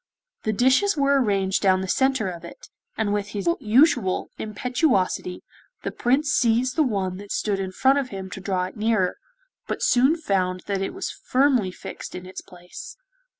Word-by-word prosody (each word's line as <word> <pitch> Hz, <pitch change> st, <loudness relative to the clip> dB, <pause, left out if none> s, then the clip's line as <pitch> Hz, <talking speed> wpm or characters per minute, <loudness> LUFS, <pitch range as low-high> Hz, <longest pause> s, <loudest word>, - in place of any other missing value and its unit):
The 215 Hz, -, +2 dB
dishes 260 Hz, -, +3 dB
were 280 Hz, -1 st, +3 dB
arranged 195 Hz, -4 st, +1 dB
down 190 Hz, -1 st, +3 dB
the 190 Hz, -, -4 dB
centre 265 Hz, 0 st, +1 dB
of 175 Hz, -2 st, -6 dB
it, 170 Hz, -, -12 dB, 0.3 s
and 210 Hz, -2 st, 0 dB
with 205 Hz, -1 st, -1 dB
his 195 Hz, -3 st, -3 dB
usual 235 Hz, -, +3 dB
impetuosity 215 Hz, -, -1 dB, 0.4 s
the -, -, -2 dB
Prince 280 Hz, +5 st, +1 dB
seized 245 Hz, +1 st, +2 dB
the 320 Hz, -, +3 dB
one 195 Hz, -9 st, 0 dB
that 200 Hz, +1 st, -10 dB
stood 205 Hz, -2 st, -1 dB
in 190 Hz, -1 st, -3 dB
front 265 Hz, +8 st, +3 dB
of 265 Hz, -2 st, -3 dB
him 190 Hz, -1 st, -6 dB
to 190 Hz, -, -7 dB
draw 190 Hz, -2 st, -1 dB
it 185 Hz, -, -6 dB
nearer, 215 Hz, -4 st, +1 dB, 0.5 s
but -, -, -3 dB
soon 265 Hz, +6 st, +4 dB
found 185 Hz, -, -1 dB
that 200 Hz, -1 st, -2 dB
it 195 Hz, -, -3 dB
was 380 Hz, -, -3 dB
firmly 255 Hz, -6 st, +1 dB
fixed 180 Hz, -, -8 dB
in 180 Hz, -, -7 dB
its 185 Hz, -, -8 dB
place. 185 Hz, -, -11 dB
210 Hz, 180 wpm, -24 LUFS, 190-260 Hz, 0.5 s, soon